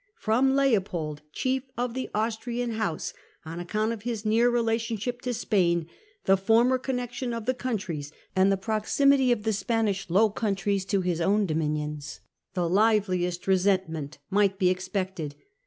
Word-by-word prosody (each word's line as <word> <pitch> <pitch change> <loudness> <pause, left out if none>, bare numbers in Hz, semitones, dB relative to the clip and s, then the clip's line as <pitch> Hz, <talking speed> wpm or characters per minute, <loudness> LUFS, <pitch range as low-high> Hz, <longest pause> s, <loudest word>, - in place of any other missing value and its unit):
From 255 +5 +2
Leopold, 185 - +1
chief 260 +7 0 0.2
Rhine 245 -1 -1
he 260 - -2
^ - - -2
ie - - -11
Austrian 235 +2 -1
House, 215 -8 -2 0.3
on 165 +2 -6
account 215 +5 -1
of 225 - -7
his 230 -2 -4
near 225 +3 +4
Princes. - - -1
relationship 230 +1 -1
to 250 - -2
Spain, 180 -8 +1 0.4
the 195 - +6
former 230 +6 +3
connection 250 -1 -3
of 230 -2 -5
the 255 - +2
countries, 185 - -4 0.2
and 190 +1 +4
the 195 - +2
proximity 250 +6 +2
of 225 -4 +1
the 220 0 +1
Spanish 200 -2 -1
Low 205 +5 +4
Countries 200 -2 -1
to 195 -1 +1
his 175 -2 -1
own 205 +4 +3
dominions, 150 -2 -2 0.4
the 175 -2 +1
liveliest 185 -3 +2
resentment 185 -7 +1
might 200 -1 +3
be 185 -2 +3
expected. 185 -5 -3
205 Hz, 160 wpm, -27 LUFS, 180-235 Hz, 0.4 s, the